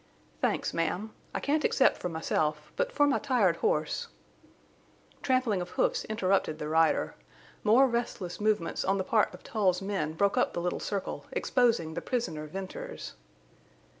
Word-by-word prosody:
"Thanks, - - 0
ma'am. 180 +6 -1 0.2
I - - -2
can't 300 +1 +1
accept 270 - +4
for 180 - -3
myself—but 160 - -1
for 290 - +3
my 285 - +2
tired 235 -11 +2
horse—" 460 +3 0 1.1
Trampling 255 -7 +1
of 175 - -5
hoofs - - 0
interrupted 195 -7 +1
the 150 - -4
rider. 160 +1 +2 0.5
More 235 +5 +6
restless 235 -7 -3
movements 210 -5 +1
on 195 +1 +1
the 190 - 0
part 215 +2 +2
of - - -13
Tull's 190 -5 +1
men 195 -6 -2
broke 200 +4 +2
up - - +1
the 175 - -2
little 175 0 -1
circle, 200 -2 -4
exposing 230 -11 +2
the - - -4
prisoner 195 -12 -2
Venters. 190 +4 -7
200 Hz, 150 wpm, -29 LUFS, 170-245 Hz, 1.1 s, More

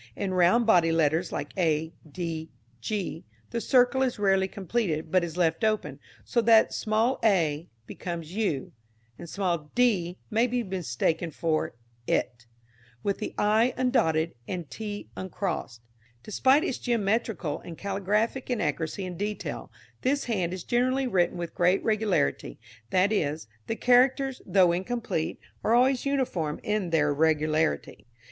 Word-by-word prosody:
In 195 -2 -2
round 185 +7 +4
bodied 170 -6 +4
letters 160 +2 +1
like 145 - -5
a, 160 -3 0 0.2
d, 165 -1 -4 0.3
g, 195 - -3 0.3
the 235 - -2
circle 250 +3 +3
is 260 -2 0
rarely 195 -2 +2
completed, 185 -6 -2
but 185 -1 +3
is 170 0 -5
left 165 0 +1
open, 215 -1 0 0.3
so 235 - +1
that 225 -1 +5
small 220 +4 +1
a 170 -7 +2 0.2
becomes 170 +2 -6
u, 195 -10 -1 0.5
and 170 - -8
small 170 -6 -2
d 190 -8 +2
may 225 +3 +3
be 245 0 -1
mistaken 170 - -1
for 155 -5 -1 0.3
it, 120 -1 -1 0.6
with 200 - -1
the 215 - -5
i 220 +4 +3
undotted 165 -11 +1
and 175 -5 -5
t 205 -2 -6
uncrossed. 180 - -4 0.4
Despite 265 - +3
its 270 - -2
geometrical 220 - -1
and 165 -2 -10
caligraphic 205 +6 -1
inaccuracy 195 -6 -2
in 180 -2 -6
detail, 210 +2 -4 0.3
this 280 +2 +1
hand 190 -8 -1
is 185 -1 -5
generally 255 +2 +1
written 180 -7 +1
with 170 -1 -5
great 180 +1 +2
regularity, 200 - 0 0.3
that 190 +2 +3
is, 155 - -1 0.2
the 225 - -1
characters, 255 +2 +3
though 185 -3 +5
incomplete, 190 -2 -2 0.2
are 225 - +3
always 255 +2 +3
uniform 190 - -1
in 210 -4 -1
their 155 -3 +2
irregularity. 155 0 0
190 Hz, 140 wpm, -27 LUFS, 165-230 Hz, 0.6 s, that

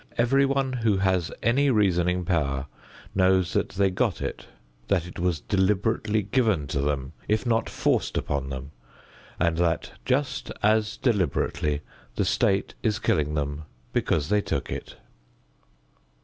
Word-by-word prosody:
Everyone 135 +2 +2
who 115 -5 +1
has 95 -3 +1
any 135 +5 +3
reasoning 90 -5 +2
power 70 -6 0 0.5
knows 95 -2 +3
that - - +1
they 95 0 +1
got 90 - 0
it, - - -5 0.4
that 90 -4 +1
it 90 - -9
was 85 -4 0
deliberately 105 +2 +1
given 105 - +1
to 70 -2 -1
them 70 0 -2
if 110 +3 +1
not 115 -1 +1
forced - - 0
upon 70 -1 -2
them, 65 +1 -6 0.7
and 85 -1 +2
that 85 -2 0
just 135 0 -1
as 110 +1 +2
deliberately 80 - 0 0.3
the - - +1
state 95 0 +1
is 110 -2 +1
killing 75 -10 0
them 75 +1 -3 0.3
because 75 -2 +1
they 105 0 +3
took - - -3
it. - - -6
95 Hz, 135 wpm, -26 LUFS, 80-110 Hz, 0.7 s, any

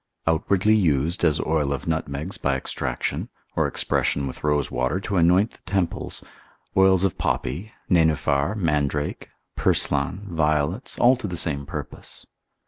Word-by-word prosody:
Outwardly 95 +6 +2
used, 85 -4 +2
as 80 -2 +3
oil 75 -3 0
of 70 - -3
nutmegs 80 +2 -3
by 70 -1 +1
extraction, 65 - -2 0.3
or - - +2
expression 70 - 0
with 65 - -7
rosewater 75 +1 0
to 100 -1 -2
anoint 90 +6 +4
the - - -19
temples, 95 -3 -1 0.5
oils 95 -1 +5
of 95 -4 0
poppy, 105 +5 -2 0.2
nenuphar, 80 -1 +2
mandrake, 75 -5 -1 0.3
purslan, 90 +8 +1
violets, 80 - 0
all 125 +2 +5
to 120 - -4
the 90 -2 -4
same 70 -4 -2
purpose. - - -7
80 Hz, 135 wpm, -24 LUFS, 75-95 Hz, 0.5 s, oils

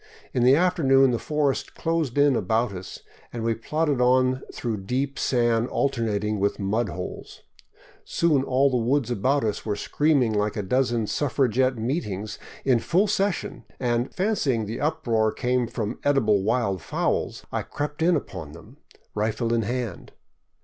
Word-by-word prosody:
In 125 - +1
the 130 +2 +6
afternoon 140 -7 +4
the 120 - -1
forest 150 -3 -1
closed 165 -6 -1
in 145 -2 +5
about 110 +3 +1
us, 95 0 -8 0.3
and 115 -2 -5
we 115 0 +1
plodded 145 +4 -1
on 130 +1 +3
through 115 -3 -3
deep 135 +5 -2
sand 120 -2 +2
alternating 110 -7 -1
with 100 +1 0
mud 105 +3 -1
holes. 90 +1 -7 0.6
Soon 155 -5 +2
all 135 +1 +2
the 125 - +2
woods 130 0 +1
about 130 +5 +1
us 105 -2 -2
were 105 -2 -2
screaming 140 0 +1
like 105 +1 0
a 105 - -1
dozen 120 +1 +1
suffragette 130 +1 +1
meetings 110 - -3 0.3
in 125 -3 +4
full 180 - +2
session 200 -2 -1 0.2
and, 120 0 0
fancying 155 - 0
the 110 +3 -5
uproar 120 -8 +1
came 125 +1 0
from 115 -1 -4
edible 115 -8 +3
wild 105 -3 0
fowls, - - -2
I - - -1
crept 150 +1 -5
in 170 +1 +4
upon 85 - -5
them, 105 - -14 0.4
rifle 110 +2 -1
in 115 - +2
hand. 120 +1 -4
125 Hz, 155 wpm, -25 LUFS, 110-140 Hz, 0.6 s, the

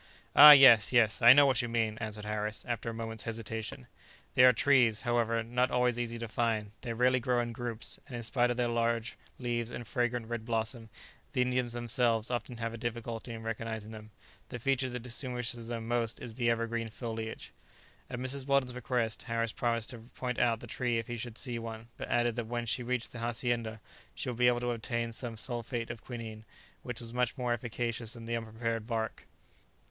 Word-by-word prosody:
"Ah! 150 +1 +12
yes, 130 -7 +9
yes; 115 -3 +3
I 120 0 +10
know 145 +2 +8
what 135 -1 +3
you 120 - -3
mean," 115 -2 0
answered 110 -1 -5
Harris, 105 0 -3
after 115 -1 -2
a - - -4
moment's 115 -1 -4
hesitation; 115 +3 -5 0.5
"they 125 - +6
are 125 - +9
trees, 120 -3 +3
however, 115 -1 +1
not 125 +2 +1
always 125 -1 +1
easy 120 -1 -2
to 115 0 -5
find; 110 -2 -1
they 120 - -4
rarely 125 +2 +3
grow 125 0 +1
in 120 0 -1
groups, 115 -1 -4
and 125 - -7
in 120 - -5
spite 120 +1 +1
of 120 - -1
their 120 -1 +1
large 115 -1 0 0.2
leaves 120 -2 -2
and 120 -1 -6
fragrant 120 0 -1
red 115 -1 -4
blossom, 115 0 -2 0.4
the 125 - +3
Indians 125 -1 0
themselves 120 -1 +1
often 120 0 -3
have 115 0 -3
a 115 - -7
difficulty 115 0 -4
in 115 -1 -7
recognizing 110 -1 -4
them; 110 -1 -10 0.4
the 125 - -5
feature 130 +1 +1
that 125 -1 -5
distinguishes 125 -2 -2
them 115 -1 -4
most 120 -1 -1
is 115 - -7
their 115 0 +2
evergreen 115 0 -2
foliage." 115 -1 -6 0.6
At 125 - -4
Mrs. 130 +2 -2
Weldon's 135 -2 +2
request, 120 -3 -1
Harris 115 -2 -1
promised 115 -2 -1
to 120 - -9
point 125 +2 -5
out 115 -2 +2
the - - -8
tree 120 0 -1
if 115 - -2
he 120 - -5
should 120 -1 -6
see 120 -3 -3
one, 115 0 -7
but - - -6
added 120 -1 +2
that 120 -2 -2
when 120 0 -2
she 115 - -1
reached 125 -1 -2
the 120 - -8
hacienda, 115 -1 -2 0.4
she 130 - -4
would 120 -1 -5
be 125 - +5
able 120 0 +3
to 120 0 0
obtain 115 0 -2
some 115 0 -5
sulphate 120 0 -3
of 115 -2 -9
quinine, 115 -3 -7 0.4
which 125 -2 -5
was 115 0 -7
much 125 +1 0
more 125 -2 0
efficacious 115 -1 -3
than 115 -1 -10
the 115 0 -2
unprepared 115 0 -3
bark. 115 -2 -3
120 Hz, 205 wpm, -31 LUFS, 115-125 Hz, 0.6 s, Ah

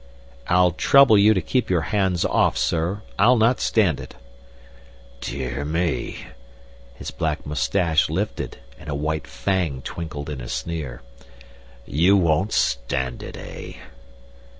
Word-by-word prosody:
"I'll 90 0 +4
trouble 140 - +5
you 105 +2 +6
to 95 - 0
keep 125 +8 0
your 90 -3 +2
hands 95 -4 +1
off, - - +2
sir. 85 +6 -1 0.2
I'll 125 +1 +6
not 115 +3 +3
stand 95 -11 +2
it." 65 - -10 1.0
"Dear 65 +1 -4
me!" 80 +2 -2 0.7
His - - -7
black 80 -1 -2
moustache 80 +3 +1
lifted 95 +7 -3 0.2
and - - -10
a 70 - -2
white 75 +2 -2
fang 90 -9 -2
twinkled 80 -4 -6
in 75 -4 -5
a - - -7
sneer. 70 -6 -4 0.8
"You 90 +7 +3
won't 90 +3 +2
stand 60 0 -1
it, - - -8
eh?" - - -9
80 Hz, 130 wpm, -23 LUFS, 75-95 Hz, 1.0 s, you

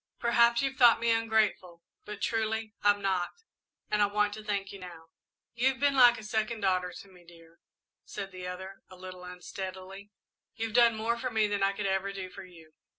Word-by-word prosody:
Perhaps 235 +1 +3
you've 270 0 -2
thought 240 -4 +6
me 230 0 +1
ungrateful, 220 -6 0 0.2
but 210 -1 -7
truly 220 -1 -1
I'm 205 0 +3
not, 190 - -2 0.5
and 210 - +2
I 205 - +5
want 210 0 0
to 215 - -8
thank 200 -2 -3
you 200 - -10
now." 170 -3 -11 0.4
"You've 260 +3 +1
been 285 0 +2
like 245 -2 +7
a 220 - -9
second 220 +1 -2
daughter 185 -2 +1
to 200 - -11
me, 180 -2 -18
dear," 165 -1 -18 0.4
said 195 -1 -7
the 185 -1 -7
other, 190 +2 -8
a 185 - -13
little 185 0 -10
unsteadily, 190 +2 -8 0.5
"you've 225 -1 -4
done 235 -1 +5
more 230 +2 -1
for 255 - -2
me 220 -2 +2
than 205 -1 -1
I 195 - +4
ever 195 -1 -1
could 200 - -6
do 185 -1 -6
for 195 - -10
you." 165 -4 -16
205 Hz, 200 wpm, -29 LUFS, 185-225 Hz, 0.5 s, like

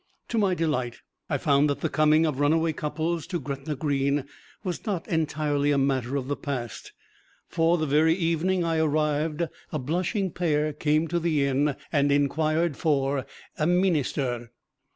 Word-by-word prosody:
To 230 - 0
my 195 -3 +2
delight 150 -8 -1 0.3
I - - +1
found 140 +1 +3
that 145 - -2
the - - +1
coming 155 +1 +3
of 150 -4 -1
runaway 160 +2 +2
couples 155 +2 -2
to 175 -1 -2
Gretna 140 +2 -4
Green 140 -1 0 0.4
was 180 -4 -4
not 195 -6 -3
entirely 150 -3 0
a 145 - +3
matter 135 -1 0
of 135 -2 -2
the 145 - -1
past, 130 -6 -5 0.6
for 165 +1 +2
the 155 - 0
very 155 +3 +3
evening 175 +1 +1
I 165 -1 0
arrived 155 +1 +1 0.3
a 155 - -1
blushing 180 - -1
pair 155 -3 0
came 155 +2 +1
to 175 - 0
the 160 -4 +1
inn 140 +1 +1 0.2
and 145 -2 +2
inquired 155 +2 +1
for 140 -3 0 0.3
a 155 - +2
"meenister." 145 -9 0
150 Hz, 160 wpm, -26 LUFS, 140-165 Hz, 0.6 s, found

